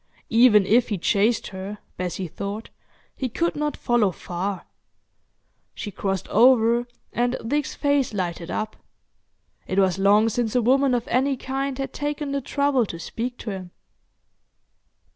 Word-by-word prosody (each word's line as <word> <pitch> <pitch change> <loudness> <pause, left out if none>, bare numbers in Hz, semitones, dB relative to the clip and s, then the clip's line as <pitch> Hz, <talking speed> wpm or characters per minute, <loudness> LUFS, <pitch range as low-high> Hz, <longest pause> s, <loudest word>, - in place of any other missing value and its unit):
Even 225 -3 +6
if 235 +5 +3
he 205 - -1
chased 205 +6 +1
her, 195 +2 -6 0.2
Bessie 180 +1 -3
thought, 200 +6 -6 0.5
he 260 - -3
could 340 +9 -1
not 300 0 -2
follow 240 -4 +2
far. 180 +2 -4 1.1
She 205 - -5
crossed 195 -1 -2
over, 235 +1 +4 0.3
and 245 +1 +1
Dick's 290 +4 -1
face 285 -3 +1
lighted 175 -4 -3
up. 215 0 -3 0.9
It 185 - -2
was 190 -1 +3
long 205 +3 +5
since 225 0 -1
a 250 - +4
woman 265 +2 +3
of 235 - -2
any 265 +2 +1
kind 270 +1 -3
had 270 -1 -4
taken 290 0 -3
the 280 0 -1
trouble 275 -3 +1
to 170 - -6
speak 240 +8 -5
to 220 - -5
him. 185 -2 -7
230 Hz, 145 wpm, -24 LUFS, 200-265 Hz, 1.1 s, Even